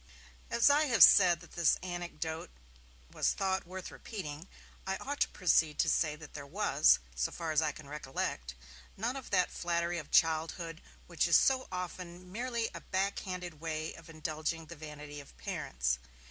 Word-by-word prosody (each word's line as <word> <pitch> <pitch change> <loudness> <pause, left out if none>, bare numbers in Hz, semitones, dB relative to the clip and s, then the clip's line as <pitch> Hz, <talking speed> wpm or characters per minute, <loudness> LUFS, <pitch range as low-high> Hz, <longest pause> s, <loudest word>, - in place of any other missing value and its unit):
As 235 - +4
I 290 +2 +5
have 245 -5 +6
said 175 -3 +7
that 170 - -14
this 170 -2 +3
anecdote 175 - -4 0.6
was - - +1
thought 190 -2 -1
worth 185 0 -7
repeating, 165 -6 -7 0.4
I 190 - 0
ought 285 +2 -5
to - - +4
proceed 160 -4 +2
to - - +3
say 150 -2 +1
that 155 -1 -12
there 140 - -6
was, 170 - +4 0.2
so 65 +1 -1
far 165 -2 -3
as 155 0 +3
I 155 -1 +1
can 150 - -12
recollect, 135 - -4 0.4
none 235 +6 -1
of 270 -2 -7
that 180 -3 +2
flattery 170 0 -1
of 155 - -9
childhood 165 +1 +1 0.2
which - - 0
is - - +7
so 260 -1 +3
often 180 0 -6
merely 235 +1 -1
a - - -7
backhanded 185 -4 -3
way 160 -1 -3
of 165 -1 -13
indulging 160 +1 -3
the 170 - -10
vanity 150 -1 -8
of 140 - -14
parents. 60 0 -2
170 Hz, 170 wpm, -32 LUFS, 155-190 Hz, 0.6 s, said